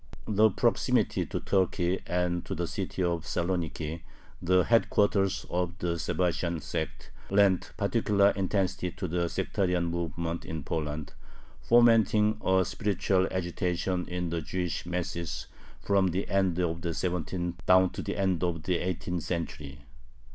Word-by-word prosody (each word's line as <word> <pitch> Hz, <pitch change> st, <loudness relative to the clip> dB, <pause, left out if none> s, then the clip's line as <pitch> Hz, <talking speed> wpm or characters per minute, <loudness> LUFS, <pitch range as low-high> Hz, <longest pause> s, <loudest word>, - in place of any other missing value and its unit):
The 110 Hz, +1 st, +4 dB
proximity 95 Hz, -, +1 dB
to -, -, -3 dB
Turkey 95 Hz, -1 st, +1 dB
and 90 Hz, 0 st, 0 dB
to -, -, -3 dB
the 85 Hz, -, -1 dB
city 95 Hz, 0 st, -3 dB
of 85 Hz, -2 st, 0 dB
Saloniki, 85 Hz, -2 st, -2 dB, 0.4 s
the 90 Hz, +1 st, +4 dB
headquarters 100 Hz, -4 st, +2 dB
of 90 Hz, 0 st, -2 dB
the 85 Hz, -1 st, -2 dB
Sabbatian 85 Hz, -1 st, 0 dB
sect, 75 Hz, +2 st, -5 dB, 0.2 s
lent 100 Hz, -2 st, +3 dB
particular 100 Hz, -1 st, +3 dB
intensity 95 Hz, -2 st, -1 dB
to 95 Hz, -, -4 dB
the 85 Hz, 0 st, -1 dB
sectarian 90 Hz, -2 st, 0 dB
movement 85 Hz, 0 st, -3 dB
in 80 Hz, -2 st, -5 dB
Poland, 75 Hz, -1 st, -3 dB, 0.5 s
fomenting 110 Hz, -2 st, +4 dB
a 95 Hz, 0 st, +3 dB
spiritual 95 Hz, -1 st, +1 dB
agitation 90 Hz, 0 st, -1 dB
in 90 Hz, -1 st, -3 dB
the 85 Hz, -1 st, -1 dB
Jewish 85 Hz, +3 st, -3 dB
masses 85 Hz, -1 st, -3 dB, 0.4 s
from 100 Hz, -1 st, +2 dB
the 90 Hz, +2 st, -2 dB
end 95 Hz, -3 st, +2 dB
of 85 Hz, -2 st, -1 dB
the 85 Hz, -1 st, -2 dB
seventeenth 90 Hz, 0 st, -3 dB
down 95 Hz, 0 st, +6 dB
to -, -, -5 dB
the -, -, -4 dB
end 95 Hz, -3 st, +1 dB
of 85 Hz, -3 st, -1 dB
the 90 Hz, 0 st, +1 dB
eighteenth 90 Hz, -1 st, -2 dB
century. 75 Hz, -5 st, -5 dB
90 Hz, 140 wpm, -29 LUFS, 85-95 Hz, 0.5 s, down